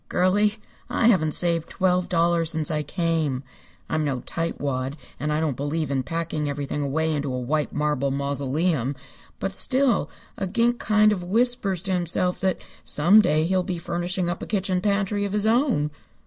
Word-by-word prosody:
"Girlie, 205 +4 +2 0.3
I 230 - +3
haven't 155 -8 +3
saved 170 -2 0
twelve 180 -1 +1
dollars 170 -1 +2
since 160 -1 0
I 155 -1 0
came. 155 -4 -1 0.4
I'm 155 - 0
no 135 -4 -1
tightwad, 140 -5 -3 0.2
and 150 +3 -1
I 150 - +1
don't 155 -4 0
believe 145 +2 -2
in 135 -1 +1
packing 155 0 -3
everything 145 +1 -3
away 160 +3 0
into 145 -2 -2
a 125 - -2
white 145 +4 -1
marble 150 -2 0
mausoleum, 140 +1 0 0.4
but 195 0 -3
still 260 -2 +2 0.3
a 195 - -2
gink 235 +4 +1
kind 215 0 +4
of 190 -4 -2
whispers 205 -2 +1
to 195 - -3
himself 180 0 0
that 190 -1 +1 0.3
some 180 +9 +5
day 155 -6 +2
he'll 185 +2 +2
be 180 -1 -3
furnishing 175 +2 -2
up 175 +1 -3
a - - -5
kitchen 190 -3 0
pantry 205 0 0
of 200 -1 -3
his 210 0 0
own." 225 - +2
170 Hz, 175 wpm, -24 LUFS, 150-195 Hz, 0.4 s, some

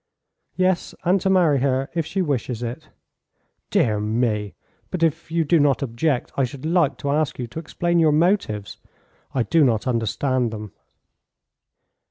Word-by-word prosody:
"Yes, 185 -1 0
and 185 +2 +2
to 190 - +1
marry 170 -7 +4
her 135 0 +1
if 165 -3 -1
she 185 +1 -1
wishes 125 -5 -2
it." 125 +7 -6 0.8
"Dear 105 -3 +2
me! 105 -2 -1 0.3
But 180 -2 -2
if 165 +1 0
you 165 0 +1
do 165 +2 +4
not 140 -3 +2
object 130 +2 -1
I 135 - +1
should 130 +3 -5
like 160 -6 +2
to 140 - -2
ask 150 -1 0
you 125 - -3
to 120 +7 -7
explain 170 +2 -1
your 160 -2 +4
motives. 150 - +1 0.6
I 130 - +2
do 165 +5 +3
not 115 -5 +2
understand 125 +1 0
them." 105 -2 -7
140 Hz, 160 wpm, -22 LUFS, 120-165 Hz, 0.8 s, marry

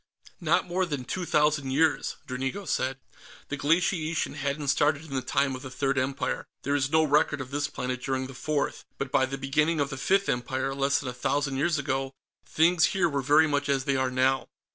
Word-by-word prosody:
"Not - - +2
more 185 +1 -1
than 145 -5 -4
two 180 +7 -3
thousand 150 -2 +2
years," 155 +3 +1
Dranigo 135 +10 -4
said. 130 -1 0 0.5
"The 145 - -2
glaciation 165 +2 +1
hadn't 140 0 -2
started 150 +2 +2
in 145 - -9
the 130 - 0
time 135 +1 0
of 130 - -8
the 130 - -7
Third 135 0 0
Empire. 135 +1 -2 0.2
There 140 - 0
is 135 -2 +1
no 160 0 +4
record 150 -1 +2
of 130 0 -6
this 145 0 -1
planet 125 -2 -4
during 130 +1 -1
the 135 - -9
Fourth, 145 +2 -2
but 135 -1 -4
by 130 - +3
the 135 +1 -4
beginning 150 +4 +1
of 140 0 0
the 135 - -5
Fifth 195 +8 +2
Empire, 130 +2 -1
less 140 +1 +1
than 145 - -4
a - - -5
thousand 135 +2 -1
years 160 +3 +1
ago, 135 -1 -2 0.3
things 165 +1 +4
here 180 -2 +4
were 140 -3 -1
very 150 +4 +5
much 145 -2 -1
as 135 -1 +1
they 140 - +1
are 130 -1 +1
now." 130 +1 +1
140 Hz, 210 wpm, -27 LUFS, 130-150 Hz, 0.5 s, very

